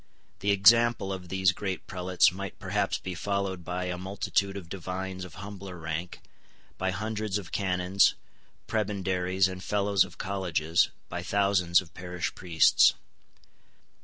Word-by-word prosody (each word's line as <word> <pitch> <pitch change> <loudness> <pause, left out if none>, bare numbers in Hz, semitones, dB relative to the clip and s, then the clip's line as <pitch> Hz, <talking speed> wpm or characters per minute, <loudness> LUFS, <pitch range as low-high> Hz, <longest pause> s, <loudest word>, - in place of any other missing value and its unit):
The 100 - -1
example 110 0 +5
of 90 -2 -8
these 95 0 +3
great 95 0 -4
prelates 90 -1 +2
might 95 +1 -7
perhaps - - -1
be 95 - -6
followed 95 0 -2
by 90 +1 -3
a 90 -1 -3
multitude 95 +1 -1
of 90 -4 -8
divines 95 +1 -5
of 90 - -10
humbler 100 0 -8
rank, 80 +2 -5 0.6
by 95 - 0
hundreds 105 +1 -2
of 95 -4 -8
canons, 95 0 +2 0.5
prebendaries, 95 -3 0
and 95 0 -7
fellows 100 -2 +2
of - - -11
colleges, 85 -4 +1 0.2
by - - -4
thousands 100 -3 +3
of 90 - -16
parish 90 -1 -4
priests. 85 -3 +4
95 Hz, 135 wpm, -28 LUFS, 90-100 Hz, 0.6 s, example